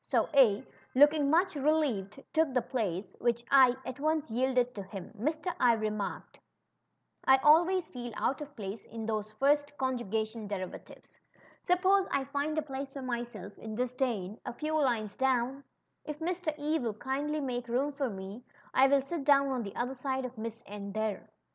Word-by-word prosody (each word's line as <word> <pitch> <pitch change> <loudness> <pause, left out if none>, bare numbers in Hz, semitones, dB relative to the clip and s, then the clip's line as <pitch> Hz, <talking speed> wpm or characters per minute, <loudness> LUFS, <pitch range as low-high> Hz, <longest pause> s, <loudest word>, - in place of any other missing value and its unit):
So - - +1
A, 235 -8 +5 0.3
looking 290 +1 +5
much 355 +5 +3
relieved, 275 -9 0
took 315 -4 +2
the 235 +3 +2
at 260 +1 -6
once 310 -3 0
yielded 250 +1 +1
to 205 - -5
him; 195 0 -8
Mr. 310 - -2
I 245 -2 +5
remarked, 215 -2 -3 0.9
I 265 - +7
alv^ays 340 +6 +5
feel 245 -6 -7
out 275 - 0
of 290 -1 -8
place 200 0 -6
in 225 0 -6
those 215 -1 -2
first 290 +4 +2
conjugation 225 -4 -2
derivatives. 190 -2 -7 0.4
Suppose 375 +2 +3
I 275 - +1
find 285 +3 -2
a 310 - +1
place 275 -1 -5
for 270 0 -7
myself 235 -5 -5
in 220 -1 -6
disdane^ 240 -6 -1
a - - -5
few 305 +5 -3
lines 235 -9 +1
down? 265 +1 +1 0.4
If 300 -1 -5
Mr. 345 0 -2
E 305 +2 0
will 230 -4 -2
kindly 285 +6 -2
make 245 -3 -3
room 265 +5 0
for 275 -2 -1
me 195 +2 -7 0.3
I 265 +1 +6
will 275 0 +3
sit 310 +1 -4
down 275 -1 +5
on 260 -2 -1
the 200 -3 -7
other 250 +2 -2
side 265 0 -2
of 255 0 -7
Miss 225 +1 -6
N, 200 -1 -7
there." 215 -2 -2
260 Hz, 165 wpm, -31 LUFS, 220-290 Hz, 0.9 s, I